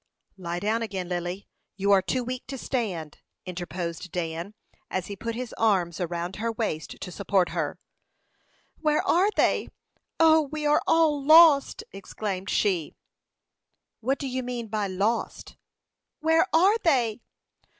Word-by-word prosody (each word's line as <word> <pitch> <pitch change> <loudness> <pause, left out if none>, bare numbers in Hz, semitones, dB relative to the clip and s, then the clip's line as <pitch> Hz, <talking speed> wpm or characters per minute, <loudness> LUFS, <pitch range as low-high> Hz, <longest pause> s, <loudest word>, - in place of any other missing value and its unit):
"Lie 175 -1 -4
down 220 +3 0
again, 195 -5 -4
Lily. 180 +2 -4 0.3
You 200 +1 +1
are 195 -1 +6
too 250 +6 -1
weak 255 +1 -5
to 270 +1 -5
stand," 190 - -3 0.3
interposed 175 -1 -5
Dan, 170 +3 -4 0.3
as 185 -1 -2
he 200 - -6
put 230 +3 -5
his 250 -1 -5
arms 185 -7 +1
around 175 +1 -3
her 230 +2 -1
waist 215 -9 -4
to 180 - -7
support 195 -1 +1
her. - - -3 1.0
"Where 305 -1 +1
are 370 +4 +4
they? - - +2 0.5
O, 320 -1 +6
we 300 +1 -5
are 295 0 +4
all 310 -3 +3
lost!" 310 -1 +6
exclaimed 195 -1 -5
she. 185 -7 0 1.0
"What 265 +4 0
do 275 - -4
you 260 0 -2
mean 245 -2 -5
by 210 -1 -1
lost?" 200 +5 -2 0.6
"Where 325 +2 +3
are 385 +7 +4
they?" 245 - +1
215 Hz, 140 wpm, -26 LUFS, 185-275 Hz, 1.0 s, are